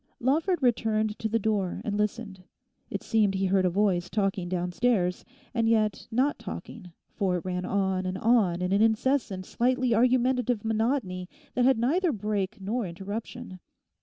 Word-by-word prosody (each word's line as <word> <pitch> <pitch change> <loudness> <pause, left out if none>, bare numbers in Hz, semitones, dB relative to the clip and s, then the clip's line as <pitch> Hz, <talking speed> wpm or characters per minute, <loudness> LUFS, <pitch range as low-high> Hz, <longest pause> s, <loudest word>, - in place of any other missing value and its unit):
Lawford 310 +6 +1
returned 220 -3 +1
to 220 - -2
the 225 - +2
door 205 -4 -1
and 205 - -1
listened. 210 -2 -3 0.5
It - - -4
seemed 210 -4 +2
he 190 0 0
heard 190 0 +2
a - - +4
voice 180 -2 +1
talking 195 -4 -1
downstairs, 180 +2 0 0.3
and 230 -2 +1
yet 215 -2 +1
not 260 +6 +1
talking, 185 -7 -8 0.2
for 190 -4 0
it 175 - -7
ran 180 0 -2
on 190 -1 0
and 185 0 -3
on 195 -5 +2
in 180 - -1
an 200 +2 +3
incessant 220 -3 +1
slightly 250 +2 +1
argumentative 250 -1 +2
monotony 220 -5 -1 0.2
that 245 - +2
had 265 -1 +4
neither 320 +10 +2
break 210 -2 -2
nor 210 +3 -2
interruption. 200 +3 -7
215 Hz, 160 wpm, -27 LUFS, 190-240 Hz, 0.5 s, a